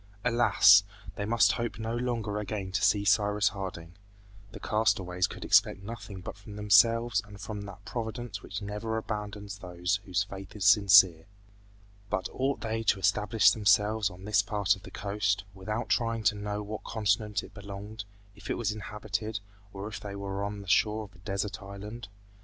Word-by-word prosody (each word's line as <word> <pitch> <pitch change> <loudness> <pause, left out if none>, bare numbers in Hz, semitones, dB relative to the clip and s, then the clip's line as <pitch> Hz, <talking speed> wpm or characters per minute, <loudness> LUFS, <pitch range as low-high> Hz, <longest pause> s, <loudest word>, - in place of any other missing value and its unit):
Alas! 115 -4 +6 0.3
they 105 - -3
must 110 -3 +4
hope 115 +4 -3
no 110 +1 -3
longer 115 -4 -2
again 100 -2 -4
to 100 +1 -1
see 100 0 +3
Cyrus 105 0 +3
Harding. 90 -4 -7 0.6
The - - -9
castaways 95 -5 +1
could - - -8
expect 100 - +4
nothing 100 -3 -8
but 90 - -7
from 100 +1 -12
themselves 110 +2 +4
and 105 -1 -13
from 105 +1 -6
that 100 - -12
Providence 115 -3 -5
which 100 +2 -6
never 105 +2 -3
abandons 105 -2 -5
those 90 +1 -2
whose 95 0 0
faith 95 0 -10
is 100 -2 -3
sincere. 100 -5 +6 0.8
But 95 -3 -1
ought 135 +2 -1
they 115 0 -2
to 110 - +2
establish 105 +4 +4
themselves 105 0 +3
on 90 +2 -12
this 105 -2 +3
part 100 0 +1
of 100 - -15
the - - -11
coast, 100 -1 -1
without 105 +4 -4
trying 115 -2 0
to 105 0 +3
know 105 0 -4
to 105 - -4
what 105 +1 -6
continent 105 -1 0
it - - -13
belonged, 105 +1 -8 0.3
if - - -11
it - - 0
was 110 -3 -1
inhabited, 105 +1 -4 0.3
or 100 +1 -6
if 110 - -6
they 100 -1 -7
were 100 0 -4
on 100 0 -4
the - - -15
shore 110 +3 +2
of 100 -1 -13
a 85 - -18
desert 100 +1 -3
island? 100 +3 -8
105 Hz, 180 wpm, -29 LUFS, 100-110 Hz, 0.8 s, Alas